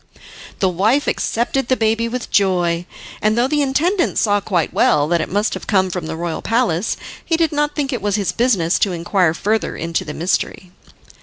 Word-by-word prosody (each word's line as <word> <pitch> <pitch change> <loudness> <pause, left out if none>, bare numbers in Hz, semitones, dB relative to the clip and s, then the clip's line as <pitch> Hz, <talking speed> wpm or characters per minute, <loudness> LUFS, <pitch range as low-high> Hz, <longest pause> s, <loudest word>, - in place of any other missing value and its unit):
The 190 - +1
wife 215 - +2
accepted 240 +2 -1
the 260 - +2
baby 225 +1 +1
with 245 +1 -5
joy, 175 -3 +1 0.3
and 215 +1 +2
though 240 +2 +3
the 295 +1 +1
intendant 330 +7 +1
saw 205 -2 +2
quite 175 -6 -1
well 145 0 +3
that 170 0 +1
it - - -4
must 205 +3 0
have - - -7
come 190 -3 +2
from 175 -3 -4
the - - -4
royal 165 0 -3
palace, 225 -5 0 0.3
he 325 - 0
did 325 -2 +1
not 295 0 0
think 280 -2 -1
it 245 - -3
was 205 -1 0
his 200 -3 0
business 200 -9 +1
to 195 - +1
inquire 175 -1 +1
further 215 +4 -1
into 165 0 -2
the 150 - -7
mystery. 180 +1 -2
205 Hz, 200 wpm, -19 LUFS, 175-250 Hz, 0.3 s, though